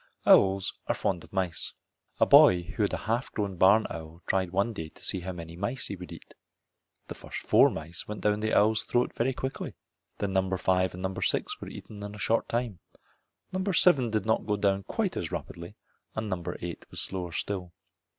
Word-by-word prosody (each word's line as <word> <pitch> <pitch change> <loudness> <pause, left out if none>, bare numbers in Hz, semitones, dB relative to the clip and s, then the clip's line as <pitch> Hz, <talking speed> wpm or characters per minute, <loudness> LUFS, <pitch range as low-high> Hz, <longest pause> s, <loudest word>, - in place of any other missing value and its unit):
Owls 95 -1 +5
are - - +1
fond 90 -4 -1
of - - -16
mice. 95 -4 -1 0.5
A - - +6
boy 90 -1 +7
who 100 +6 -5
had 100 - +2
a - - -1
half 115 +4 -1
grown 100 -3 -2
barn 100 +5 +5
owl 80 +1 -8
tried 95 -1 +1
him 85 - -15
one 100 +4 +1
day 80 -6 -6
to - - -17
see 95 - 0
how 90 +1 -5
many 85 -2 -8
mice 100 +8 -3
he 100 - -3
would 90 -1 -10
eat. - - -12 0.7
The - - -7
first - - -8
four - - +5
mice 80 +2 -4
went 105 0 -6
down 105 0 +2
the 110 0 -1
owl's 110 +1 +4
throat 120 0 0
very 125 +3 +1
quickly. 130 +1 -5 0.4
Then 100 -2 -2
number 95 0 +1
five 90 -1 +1
and 90 - -7
number 95 0 -3
six - - 0
were - - -6
eaten 105 -2 -10
in 105 0 -6
a - - -9
short 115 +2 0
time. 115 -6 -2 0.7
Number 190 +1 -1
seven 145 -9 +5
did 110 -1 -1
not 110 -1 +1
go 105 - +2
down 100 -1 +1
quite - - -1
as - - -3
rapidly 85 +4 -6 0.4
and 110 0 -2
number 90 -4 -3
eight 85 -1 -7
was - - -6
slower 90 -3 -1
still. 90 0 -3
100 Hz, 210 wpm, -28 LUFS, 90-110 Hz, 0.7 s, boy